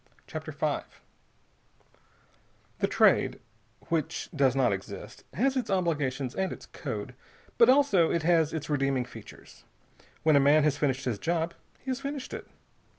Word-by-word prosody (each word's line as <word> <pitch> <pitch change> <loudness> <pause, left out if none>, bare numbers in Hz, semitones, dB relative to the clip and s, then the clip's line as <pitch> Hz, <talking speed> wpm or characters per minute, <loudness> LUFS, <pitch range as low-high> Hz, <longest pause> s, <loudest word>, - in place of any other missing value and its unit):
CHAPTER - - -6
V - - 0 2.0
The - - +2
Trade - - +3 0.5
which 160 -4 -2
does 135 -2 +3
not 130 -6 +3
exist 95 -1 -8
has 265 +7 +2
its 255 -4 -1
obligations 145 -9 0
and 190 0 -1
its - - -8
code, - - -6 0.5
but 235 - +7
also 255 - +5
it 170 - 0
has 165 -2 +3
its 155 -2 -4
redeeming 135 -3 0
features. 125 - -13 0.6
When 155 -1 +5
a - - +7
man 145 +2 +5
has 150 -2 +2
finished 135 -3 -1
his 115 -5 -1
job, 170 0 -1 0.3
he 265 - -4
has 255 - -2
finished 275 -1 -5
it. - - -7
155 Hz, 150 wpm, -28 LUFS, 135-190 Hz, 2.0 s, but